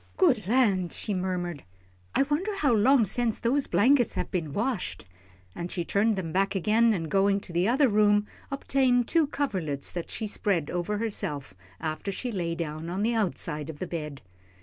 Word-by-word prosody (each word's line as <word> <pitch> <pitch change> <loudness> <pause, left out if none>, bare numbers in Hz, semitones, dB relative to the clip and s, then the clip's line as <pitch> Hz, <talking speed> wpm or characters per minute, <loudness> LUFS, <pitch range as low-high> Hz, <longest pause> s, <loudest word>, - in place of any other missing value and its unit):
"Good 255 - +3
land!" 200 -7 +2
she 210 - -3
murmured, 180 -4 -3 0.5
"I - - +5
wonder 300 +8 -1
how 285 -9 +2
long 235 +3 +5
sence 230 +3 0
those 265 +4 +1
blankets 245 +2 +3
has - - -1
been 165 -6 -2
washed?" 220 - -2 0.5
and 170 +1 -5
she 175 - -2
turned 210 +4 +2
them 175 -4 -4
back 195 +2 +1
again, 220 +5 +3
and, 165 -3 -3
going 195 +4 +2
to 175 - -7
the 175 +3 +2
other 265 +4 +4
room, 205 -1 +3 0.2
obtained 265 -3 +2
two 325 -3 +3
coverlets 185 - -2
that 175 -2 -5
she 220 - -3
spread 195 -6 -1
over 180 +4 -2
herself, 150 - -3 0.3
after 160 +5 -3
she 245 +5 -4
lay 170 -5 -2
down 160 0 -4
on 190 +4 -2
the 235 +2 +2
outside 165 -8 -2
of 155 - -7
the 185 - -4
bed. 150 -5 -6
200 Hz, 180 wpm, -27 LUFS, 170-235 Hz, 0.5 s, I